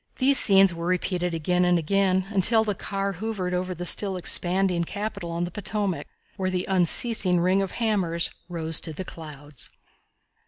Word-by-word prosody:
These 270 +1 +4
scenes 195 -2 +5
were 170 0 -5
repeated 180 -1 -1
again 180 +3 0
and 180 0 +3
again 190 +2 +1
until 220 +3 +4
the 210 -2 -2
car 195 +1 -3
hovered 195 -2 -4
over 180 0 -3
the 175 +1 -6
still 195 +1 +1
expanding 180 0 +1
capital 200 -1 -5
on 170 +1 -3
the 175 - -4
Potomac, 205 -1 -3 0.3
where 190 -2 -1
the 180 -1 -2
unceasing 185 +1 +3
ring 185 +3 +2
of 195 - -4
hammers 190 -8 +1 0.2
rose 165 -2 0
to 160 - -5
the 185 +5 -7
clouds. 145 -5 -7
185 Hz, 165 wpm, -24 LUFS, 170-195 Hz, 0.3 s, scenes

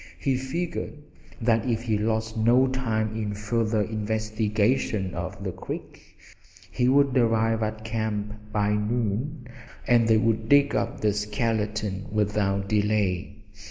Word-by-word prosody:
He 135 -2 0
figured 155 +9 -3 0.4
that 115 0 +1
if 115 -1 0
he 110 -3 0
lost 110 +1 -1
no 120 +4 +4
time 110 -5 -1
in 105 -2 -3
further 110 +1 0
investigation 110 -1 0
of 90 +3 -5
the 95 - -2
creek - - -9 0.5
he 125 0 +2
would 140 -1 +4
arrive 115 -2 +2
at 110 0 -3
camp 110 -2 -2 0.2
by 105 -1 +1
noon, 120 +6 -1 0.4
and 120 -2 +4
they 110 -1 +5
would 110 0 +1
dig 145 0 +5
up - - -2
the 105 -1 +2
skeleton 105 -1 -2
without 100 -2 0
delay. 105 -3 0
110 Hz, 130 wpm, -26 LUFS, 105-115 Hz, 0.5 s, they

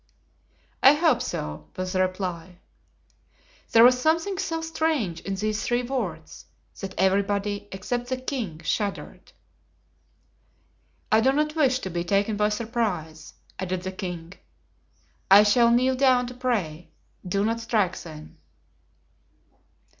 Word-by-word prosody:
"I 270 - +8
hope 315 +1 +2
so," 75 0 -5
was 185 0 -3
the 185 - +2
reply. 185 -2 -3 1.1
There 230 - +7
was 250 +1 +6
something 335 +6 +1
so 330 -4 -2
strange 315 - -1
in 195 +2 -4
these 215 +2 -2
three 245 0 0
words 205 -12 -5 0.3
that 190 -1 -6
everybody, 200 +2 0
except 240 +6 -3
the 260 0 -2
king, 240 - -4
shuddered. 200 +4 -3 1.8
"I 220 +1 +5
do 260 +3 +4
not 300 +2 0
wish 270 -5 +3
to 190 - -5
be 170 0 -2
taken 200 +4 +1
by 210 0 +2
surprise," 210 -9 -3 0.2
added 185 -1 -3
the 185 - -4
king. 180 -2 -6 1.0
"I 200 +2 +9
shall 235 +3 +4
kneel 250 +2 +3
down 255 -2 +4
to 245 - -7
pray; 205 -11 -2 0.3
do 195 +2 -1
not 230 +1 0
strike 215 -5 0
then." 155 -2 -11
210 Hz, 130 wpm, -25 LUFS, 185-250 Hz, 1.8 s, I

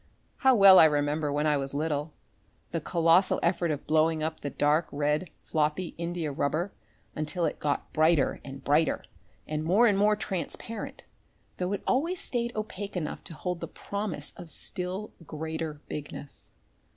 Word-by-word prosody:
How 265 -2 +5
well 195 -3 +9
I - - +9
remember 150 0 +1
when 145 +1 0
I 150 -1 +3
was 135 0 -4
little, 150 0 -1 0.6
the - - -2
colossal 170 +3 +3
effort 170 0 +1
of 145 -2 -3
blowing 155 0 +2
up 160 0 -2
the 145 - -4
dark 150 +4 +2
red, 150 +4 0
floppy 155 +3 -1
India 170 -2 -3
rubber 155 +7 -1 0.4
until 160 +3 -1
it 155 - -2
got 145 -1 -2
brighter 155 -2 +3
and 135 0 -9
brighter 150 +3 +2 0.4
and 155 0 -2
more 195 +9 +4
and 210 -4 +4
more 210 +1 +4
transparent, 210 +3 -5 0.5
though 180 +1 -1
it 200 - -3
always 330 +8 +1
stayed 235 -1 -1
opaque 205 -2 -4
enough 160 -4 -4
to 165 - -8
hold 180 +2 -3
the - - -5
promise 200 -8 -4
of 170 - -9
still 185 +5 -2 0.2
greater 160 -1 -4
bigness. 145 -1 -8
160 Hz, 160 wpm, -28 LUFS, 150-185 Hz, 0.6 s, well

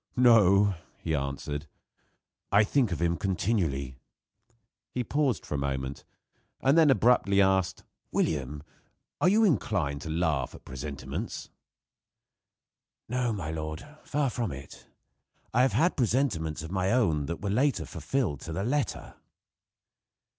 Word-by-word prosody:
"No," 105 -5 +6 0.2
he 80 - -3
answered, 75 +1 -3 0.8
"I 100 +2 +6
think 120 0 +1
of 85 - -2
him 85 0 +1
continually." 85 - -1 0.9
He 125 - -2
paused 140 -1 0
a - - 0
moment, 70 0 -3 0.6
and 135 +2 +3
then 160 -2 +6
abruptly 115 -6 +4
asked: 95 -2 +2 0.3
"William, 75 -1 -1 0.6
are 180 - +5
you 215 +3 +4
inclined 95 - +1
to 80 - -6
laugh 80 -5 0
at - - -15
presentiments?" 70 +1 -6 1.6
"No, 125 0 0
my 90 -8 -3
lord, 80 - -5 0.2
far 145 -3 0
from 115 -5 -2
it. 70 0 -10 0.7
I 120 - +4
have 130 - +3
had 175 +3 +2
presentiments 110 - 0
of 80 - -7
my 95 0 0
own 80 - +2
that 85 +2 -5
were 100 - -1
later 125 - +1
fulfilled 85 - -2
to 80 - -7
the 95 +4 -2
letter." 140 +5 -2
95 Hz, 130 wpm, -28 LUFS, 75-125 Hz, 1.6 s, No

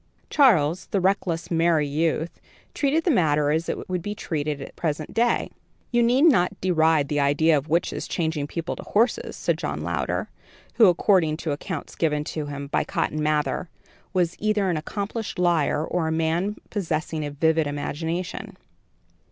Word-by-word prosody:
Charles, 185 - +4
the 200 - 0
reckless, 180 -3 0
merry 165 -2 +2
youth, 160 +3 -1 0.3
treated 295 +3 +1
the 345 - +2
matter 150 - +2
as 160 +2 0
it - - -4
would 180 -1 -2
be 205 +4 -4
treated 150 -5 -3
at 135 - -7
the - - -20
present 155 -2 -3
day. 235 +1 +1 0.4
"You 240 -1 +3
need 245 +4 +3
not 200 - +4
deride 160 -5 +3
the 145 0 -1
idea 145 +3 +3
of 145 +2 -2
witches 170 +3 0
changing 160 -4 -1
people 165 +2 -4
to - - -6
horses," 230 +4 0
said - - -1
John - - -3
Louder, - - -2 0.5
who, 225 -4 +6
according 175 -3 +3
to 155 - 0
accounts 145 - -5
given 150 -2 0
of 155 -2 -3
him, 140 -1 -5
by 140 - 0
Cotton 155 - -2
Mather, 150 +2 0 0.4
was 180 -3 +1
either 210 -3 +1
an 165 - -1
accomplished 205 +7 -4
liar 165 -4 +2
or 170 -2 -1
a - - -1
man 165 +5 0 0.2
possessing 160 -5 -2
a 145 - -3
vivid 160 +2 +1
imagination. 160 +5 -4
165 Hz, 170 wpm, -24 LUFS, 150-190 Hz, 0.5 s, who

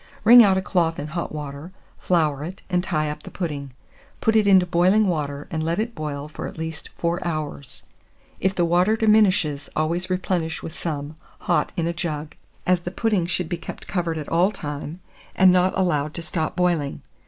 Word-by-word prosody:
Wring 240 +2 +10
out 195 -3 +4
a 190 - -1
cloth 170 -4 +1
in - - -4
hot 170 +2 -4
water, 150 +2 -7 0.3
flour 155 -5 +1
it, 180 +5 -8
and 180 0 +2
tie 155 -5 -1
up 150 - -8
the - - -10
pudding; 145 -6 -4 0.5
put 225 -1 +2
it 215 -2 +4
into 190 -2 +6
boiling 180 +5 +3
water, 145 -4 -2
and 160 - -2
let 165 +1 -1
it 230 +3 -2
boil 150 -3 -5
for 150 - -6
at - - -10
least 160 -1 -5
4 170 +2 -1
hours. 155 -5 -5 0.6
If 190 +1 0
the 175 - +2
water 180 +5 +3
diminishes, 195 -9 +3
always 170 +4 0
replenish 180 -3 -1
with 160 - -6
some, 155 -3 -5 0.2
hot 170 -4 +1
in 170 - 0
a 170 - -1
jug, 155 -3 -4 0.3
as 180 -1 +2
the 175 - -4
pudding 200 -3 0
should 180 -1 -1
be 175 - -3
kept 170 - -9
covered 170 -3 -1
all 175 +3 +3
the 210 - -10
time, 150 +3 -6 0.3
and 190 -1 +6
not 185 +1 +2
allowed 155 -5 0
to 170 - -4
stop 160 -1 -2
boiling. 175 -6 0
170 Hz, 195 wpm, -23 LUFS, 155-185 Hz, 0.6 s, Wring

